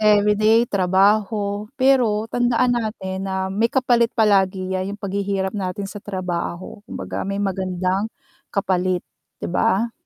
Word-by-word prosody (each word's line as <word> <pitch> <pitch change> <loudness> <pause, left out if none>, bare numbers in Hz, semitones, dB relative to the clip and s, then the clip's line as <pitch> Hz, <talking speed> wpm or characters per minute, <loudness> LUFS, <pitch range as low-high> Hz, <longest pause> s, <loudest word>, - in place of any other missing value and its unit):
everyday 215 +2 +4
trabaho. 205 +1 +1
Pero 250 -6 +3
tandaan 245 0 +2
natin 195 -5 -3
na 190 0 -2
may 225 +4 +2
kapalit 240 -3 +2
palagi 190 -3 +2
'yan, 190 +2 -2
yung - - -38
paghihirap 195 -1 -2
natin 195 -1 -3
sa 205 +1 -7
trabaho. 185 -1 -4
Kumbaga, - - -5
may 200 0 -2
magandang 185 +1 -1 0.4
kapalit, 185 -2 0 0.4
'di - - -2
ba? 225 +3 +2
200 Hz, 125 wpm, -21 LUFS, 190-220 Hz, 0.4 s, everyday